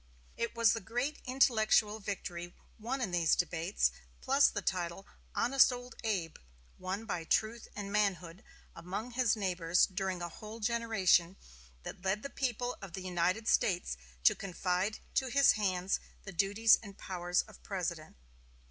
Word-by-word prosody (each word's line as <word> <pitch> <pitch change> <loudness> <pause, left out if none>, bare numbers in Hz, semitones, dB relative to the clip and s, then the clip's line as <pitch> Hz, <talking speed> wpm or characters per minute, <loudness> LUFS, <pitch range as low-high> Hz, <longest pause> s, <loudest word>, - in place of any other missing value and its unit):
It 235 0 -3
was 230 -1 +5
the 225 - -2
great 245 +9 -2
intellectual 220 -4 +3
victory 175 -4 -5 0.2
won 250 +5 -3
in 215 -7 -1
these 170 -2 +3
debates, 175 +2 0 0.3
plus 275 +2 +4
the 205 - -4
title 175 +1 -2 0.3
"Honest 270 +2 +5
old 245 -1 -7
Abe," 190 -8 -2 0.4
won 190 +4 -4
by 180 -6 -3
truth 220 +7 0
and 200 -1 -5
manhood 195 -2 -1 0.3
among 190 +8 -5
his 240 -3 +2
neighbors 180 -4 +2
during 190 -1 -3
a 175 - -3
whole 215 +6 -9
generation, 210 -6 +2 0.5
that - - -8
led 195 +2 0
the 280 - -6
people 245 -2 -2
of 195 -4 -9
the 190 - -5
United 185 +4 0
States 180 - +2 0.3
to - - +7
confide 185 +2 -2 0.2
to 265 - +1
his 280 +2 +5
hands 190 -3 0 0.2
the 195 - -8
duties 205 +5 +4
and 200 -3 -11
powers 180 -1 -1
of 215 -3 -16
President. 170 -5 -4
200 Hz, 150 wpm, -32 LUFS, 180-230 Hz, 0.5 s, to